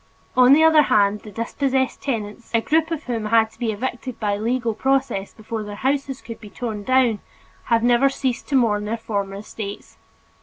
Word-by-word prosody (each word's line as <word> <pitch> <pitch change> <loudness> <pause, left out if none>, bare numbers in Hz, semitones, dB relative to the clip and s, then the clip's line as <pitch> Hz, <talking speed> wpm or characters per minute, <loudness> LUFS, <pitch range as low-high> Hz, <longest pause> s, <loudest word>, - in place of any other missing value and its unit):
On 255 +1 +7
the 315 +2 +6
other 320 -1 +7
hand, 210 -6 +3
the 210 - -12
dispossessed 260 +4 -1
tenants, 225 -4 -4
a 230 - +3
group 320 +5 +1
of 320 -3 -3
whom 230 -4 -3
had 220 0 +3
to - - -23
be 235 -3 0
evicted 245 +3 -5
by 205 -2 0
legal 230 +2 -1
process 265 -5 0
before 220 0 -6
their 205 -1 -7
houses 270 +2 -2
could 230 - -9
be 210 - -10
torn 220 -2 -5
down, 255 -3 +3 0.5
have 230 -1 +2
never 245 +3 +4
ceased 260 -2 -3
to 280 - -1
mourn 210 -5 +2
their 225 +2 -2
former 200 -3 -3
estates. 205 0 -8
230 Hz, 190 wpm, -22 LUFS, 210-265 Hz, 0.5 s, On